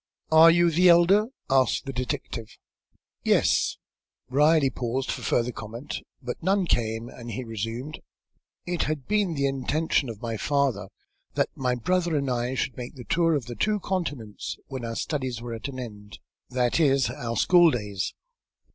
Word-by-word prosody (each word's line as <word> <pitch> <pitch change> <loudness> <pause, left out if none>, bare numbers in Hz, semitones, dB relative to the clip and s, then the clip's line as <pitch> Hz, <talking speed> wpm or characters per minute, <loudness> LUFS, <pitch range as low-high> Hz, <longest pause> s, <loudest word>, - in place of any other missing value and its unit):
"Are 160 +1 +9
you 170 0 +4
the 180 +3 +5
elder?" 180 +5 +5 0.2
asked 135 +1 +2
the 135 - -5
detective. 120 -3 -4 0.7
"Yes." - - +2 0.5
Brierly 150 0 +4
paused 125 +2 -2
for - - -4
further 120 +1 +1
comment, 115 +5 -6 0.2
but 125 0 -5
none 190 +2 +2
came, 115 -5 0
and 120 -1 -10
he 115 +3 -4
resumed. 115 +6 -5 0.7
"It 175 -1 -1
had 150 -4 -3
been 205 -5 +1
the 140 -1 0
intention 140 +1 0
of 110 -3 -7
my 115 -1 -3
father 140 0 0 0.5
that - - 0
my 125 -2 0
brother 175 +6 0
and 140 -3 0
I 125 +1 -1
should 130 - -2
make 125 +1 -7
the 125 - -9
tour 165 +4 +2
of 140 -6 -2
the 120 - -6
two 210 - 0
continents 145 - -4
when 130 -3 -6
our 115 0 -4
studies 130 -6 -2
were 120 0 -6
at 115 +4 -5
an 130 -2 -7
end; 105 -4 -9 0.3
that 125 +3 +1
is, 135 -4 +3
our 115 -5 -4
school 175 -2 +6
days. 105 - -3
130 Hz, 165 wpm, -26 LUFS, 120-160 Hz, 0.7 s, Are